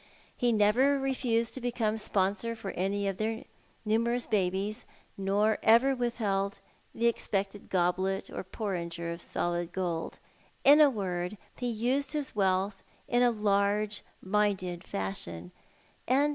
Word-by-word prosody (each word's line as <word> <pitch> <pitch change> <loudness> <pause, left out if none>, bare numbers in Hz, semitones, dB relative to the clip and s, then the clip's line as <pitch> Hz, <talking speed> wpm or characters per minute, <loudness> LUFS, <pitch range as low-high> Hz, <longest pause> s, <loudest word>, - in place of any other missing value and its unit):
He 245 -1 +2
never 230 +6 +4
refused 250 -4 0
to 260 - -5
become 230 -3 0
sponsor 205 +3 0
for 215 -4 -5
any 200 +2 -1
of 195 -1 -2
the 220 +1 -2 0.4
numerous 235 +3 +1
babies, 200 +2 0 0.3
nor 200 +3 +1
ever 245 +5 +5
withheld 205 -5 -1 0.4
the 230 - 0
expected 200 -3 -1
goblet 185 +2 +1
or - - -6
porringer 170 -4 -4
of 170 - -9
solid 175 0 -2
gold. 175 -3 -3 0.5
In 290 +2 +8
a 295 - +8
word, 185 -4 -3 0.2
ho 250 - -2
used 250 +5 0
his 295 -5 -3
wealth 195 0 +1 0.3
in 240 0 +2
a 245 - +6
large 210 -1 +1 0.2
minded 190 -3 0
fashion, 90 - -4 0.6
and 275 +4 +4
210 Hz, 130 wpm, -30 LUFS, 190-235 Hz, 0.6 s, In